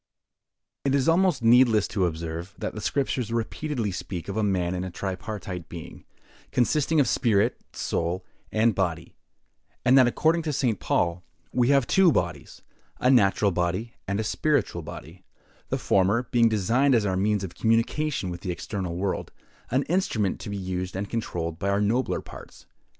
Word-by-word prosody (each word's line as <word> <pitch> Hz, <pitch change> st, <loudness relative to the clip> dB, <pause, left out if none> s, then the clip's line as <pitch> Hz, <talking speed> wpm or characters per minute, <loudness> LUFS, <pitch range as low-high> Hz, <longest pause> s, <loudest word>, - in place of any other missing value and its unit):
IT 140 Hz, 0 st, +2 dB
is 135 Hz, -2 st, +1 dB
almost 165 Hz, -6 st, +3 dB
needless 115 Hz, -3 st, +5 dB
to 95 Hz, -4 st, +1 dB
observe, 85 Hz, +2 st, -5 dB
that -, -, -4 dB
the 110 Hz, -, -6 dB
Scriptures 130 Hz, -4 st, -1 dB
repeatedly 115 Hz, 0 st, -2 dB
speak 90 Hz, -1 st, -5 dB
of 100 Hz, -, -4 dB
man 90 Hz, -3 st, 0 dB
as 90 Hz, 0 st, -2 dB
a 95 Hz, -, -4 dB
tripartite 95 Hz, -1 st, -5 dB
being, 85 Hz, 0 st, -9 dB, 0.5 s
consisting 150 Hz, +5 st, +2 dB
of 140 Hz, -, +4 dB
spirit, 115 Hz, -1 st, +2 dB
soul, 85 Hz, +2 st, -2 dB, 0.3 s
and 110 Hz, +1 st, +3 dB
body: 85 Hz, -4 st, -2 dB, 0.7 s
and 125 Hz, +2 st, +6 dB
that, 130 Hz, -2 st, +7 dB
according 160 Hz, +7 st, +2 dB
to 155 Hz, -1 st, -2 dB
St. 130 Hz, -6 st, 0 dB
Paul, 85 Hz, +1 st, 0 dB, 0.3 s
we 125 Hz, -1 st, +3 dB
have 140 Hz, -2 st, +4 dB
two 190 Hz, +2 st, +5 dB
bodies—a 125 Hz, -2 st, -3 dB
natural 100 Hz, -4 st, +4 dB
body 90 Hz, +6 st, -1 dB
and 100 Hz, +1 st, -1 dB
a -, -, 0 dB
spiritual 145 Hz, -, 0 dB
body; 80 Hz, +3 st, -10 dB, 0.5 s
the -, -, 0 dB
former 100 Hz, +5 st, +2 dB
being 115 Hz, -2 st, +4 dB
designed 115 Hz, +6 st, +2 dB
as 110 Hz, -3 st, +2 dB
our 95 Hz, -2 st, 0 dB
means 100 Hz, +1 st, +1 dB
of 95 Hz, -, -6 dB
communication 115 Hz, 0 st, 0 dB
with 85 Hz, 0 st, -7 dB
the 95 Hz, -, -5 dB
external 90 Hz, -1 st, -4 dB
world—an 100 Hz, +7 st, -3 dB
instrument 125 Hz, -, 0 dB
to -, -, -7 dB
be 100 Hz, -, -3 dB
used 90 Hz, -1 st, -4 dB
and 100 Hz, +1 st, -4 dB
controlled 85 Hz, -8 st, -3 dB
by 100 Hz, -, -1 dB
our 100 Hz, 0 st, +2 dB
nobler 115 Hz, +5 st, 0 dB
parts. -, -, -13 dB
105 Hz, 160 wpm, -26 LUFS, 90-125 Hz, 0.7 s, that